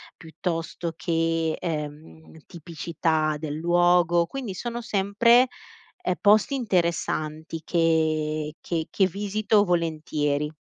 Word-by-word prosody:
piuttosto 165 +1 -4
che, 165 -1 0
ehm, 160 0 -6
tipicità 160 -2 -2
del 150 -1 -5
luogo 175 +1 +3
quindi 240 -1 -6
sono 240 +5 -4
sempre, 235 +5 +3 0.5
ehm, 185 - -1
posti 215 +6 +4
interessanti 165 - -1
che 155 -2 0
che 165 -2 -3
che 195 - +2
visito 205 +2 +1
volentieri. 155 -3 -1
165 Hz, 95 wpm, -25 LUFS, 155-190 Hz, 0.5 s, posti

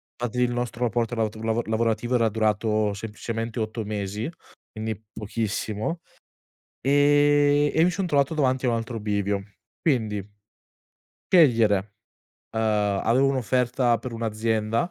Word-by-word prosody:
fatti 120 0 -3
il 125 0 +2
nostro 120 0 -3
rapporto 120 0 0
lavot 110 -1 -1
lavora 115 +1 -1
lavorativo 115 +2 0
era 115 -2 +3
durato 110 -1 +1
semplicemente 115 +2 -5
8 110 +1 -3
mesi, 105 +2 -3 0.4
quindi 110 0 -4 0.2
pochissimo, 110 - -3 0.8
ehm, 145 +1 +4
e - - +1
mi 180 - +3
son 180 +2 -2
trovato 145 -1 +1
davanti 130 -3 +1
a - - +3
un 115 - +1
altro 115 0 -4
bivio. 100 -1 -1 0.4
Quindi 110 - 0 1.1
scegliere, 115 - +4 0.6
uhm, 110 - +1 0.4
avevo 125 +5 +3
un'offerta 125 -1 +1
per 120 +1 -7
un'azienda, 115 +4 -1
115 Hz, 125 wpm, -25 LUFS, 110-130 Hz, 1.1 s, ehm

